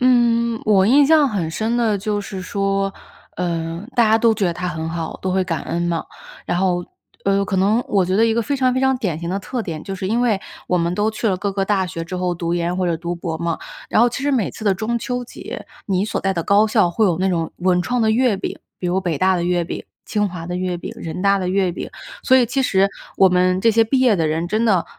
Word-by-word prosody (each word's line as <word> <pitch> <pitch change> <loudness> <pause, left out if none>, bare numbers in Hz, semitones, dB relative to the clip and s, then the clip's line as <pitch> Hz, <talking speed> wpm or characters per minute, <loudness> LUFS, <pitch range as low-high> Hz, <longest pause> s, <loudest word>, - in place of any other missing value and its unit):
嗯， 235 -2 +3
我 195 -3 +4
印 280 +5 +5
象 310 -2 +5
很 185 -9 -2
深 220 +7 -1
的 225 -3 +2
就 205 +1 -1
是 195 -2 -6
说， 195 +1 -1 0.4
呃， 170 0 -3
大 240 - +6
家 220 +1 +4
都 225 -1 +4
觉 210 -2 -1
得 175 - 0
她 180 +1 -4
很 165 -2 -4
好， 165 -1 -4
都 185 - -1
会 190 0 +1
感 165 -3 -3
恩 170 - -2
嘛， 170 -1 -1 0.4
然 175 - 0
后， 180 -1 +1 0.4
呃， 200 0 +2
可 195 -1 -2
能 205 +6 +3
我 195 -2 +2
觉 185 +2 0
得 225 - +5
一 225 - +1
个 235 - +1
非 280 +5 -1
常 255 -2 +2
非 260 - +1
常 265 0 +3
典 185 -10 -2
型 170 +1 -4
的 195 - -1
特 235 +5 -4
点， 160 -6 -5
就 195 - -4
是 190 0 -4
因 230 +4 +1
为 225 -5 +2 0.3
我 180 - +1
们 170 0 0
都 210 +3 +1
去 220 +1 -1
了 190 - +1
各 200 +2 -2
个 195 0 0
大 195 -2 +1
学 165 -1 -5
之 185 +2 -5
后 180 -1 -1
读 170 0 -3
研 175 +1 -1
或 185 -1 0
者 170 -2 0
读 170 +2 -4
博 170 -2 -4
嘛， 170 -1 -2 0.3
然 - - +3
后 240 - +5
其 245 +3 -5
实 285 - +1
每 240 -7 +1
次 220 - -9
的 200 -2 +3
中 225 +4 -2
秋 245 +1 -3
节， - - -8 0.2
你 190 -1 +1
所 215 - -2
在 195 - 0
的 170 - -1
高 205 +5 +4
校 210 -5 +3
会 215 +6 +1
有 170 -4 +1
那 190 +1 +1
种 165 -3 -1
文 180 0 +2
创 245 +5 0
的 220 - +3
月 235 -1 +2
饼， 190 - -5 0.2
比 180 - -3
如 185 +2 +1
北 175 -4 -1
大 185 0 +3
的 175 - -1
月 175 0 +1
饼、 - - -6 0.2
清 210 -1 0
华 170 -3 -7
的 180 +1 -3
月 180 -1 -2
饼、 175 - -7
人 170 +2 -5
大 200 0 +4
的 185 -1 -2
月 190 -1 +1
饼， - - -6 0.4
所 260 - +6
以 255 - +5
其 270 +4 -1
实 195 -5 +3 0.3
我 190 - +6
们 180 0 +2
这 230 - +4
些 225 +1 +4
毕 255 +4 +1
业 245 -5 +4
的 165 -3 +1
人 160 +2 -1
真 215 +4 +1
的， 195 -7 +3
195 Hz, 290 characters per minute, -20 LUFS, 175-220 Hz, 0.4 s, 大